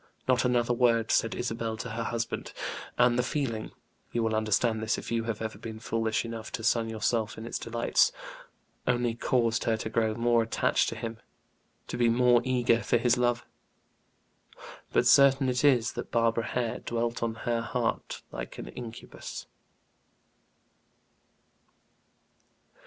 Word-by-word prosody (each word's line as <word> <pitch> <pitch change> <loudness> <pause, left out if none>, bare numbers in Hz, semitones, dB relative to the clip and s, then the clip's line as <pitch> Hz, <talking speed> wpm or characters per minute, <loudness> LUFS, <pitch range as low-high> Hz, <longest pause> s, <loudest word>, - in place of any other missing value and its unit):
Not 130 -1 +3
another 120 -1 +2
word 115 -2 +2
said 115 - +2
Isabel 115 -2 -3
to 120 +1 -5
her 115 +1 -3
husband; 115 0 -3 0.4
and 125 0 +4
the - - +5
feeling 125 -4 -2 0.4
you 120 - 0
will 110 -1 0
understand 110 +1 +1
this 110 0 0
if - - -7
you 115 -1 0
have 115 -1 -3
ever 110 - -5
been 110 -1 -7
foolish 115 0 -1
enough 115 -1 -6
to 115 - -4
sun 115 0 +2
yourself 110 0 -1
in 110 - -7
its 115 - -4
delights 115 0 +2 0.8
only 120 -1 +1
caused 115 -1 +1
her 115 -1 +2
to 110 - -5
grow 110 -1 +1
more 120 0 +3
attached 115 - +1
to - - -6
him, 115 0 -5 0.7
to - - -5
be 120 -1 +3
more 120 0 +4
eager 120 -2 +2
for - - +2
his 120 +1 +3
love. 120 -1 +1 1.5
But - - +3
certain 135 -1 +6
it 125 +2 0
is 125 -5 +4
that - - -6
Barbara 115 0 +1
Hare 120 -2 -2
dwelt 120 0 -2
on 115 -1 -1
her 120 -1 +1
heart 115 0 -2
like - - -7
an - - -7
incubus. 115 - -8
115 Hz, 150 wpm, -29 LUFS, 115-120 Hz, 1.5 s, certain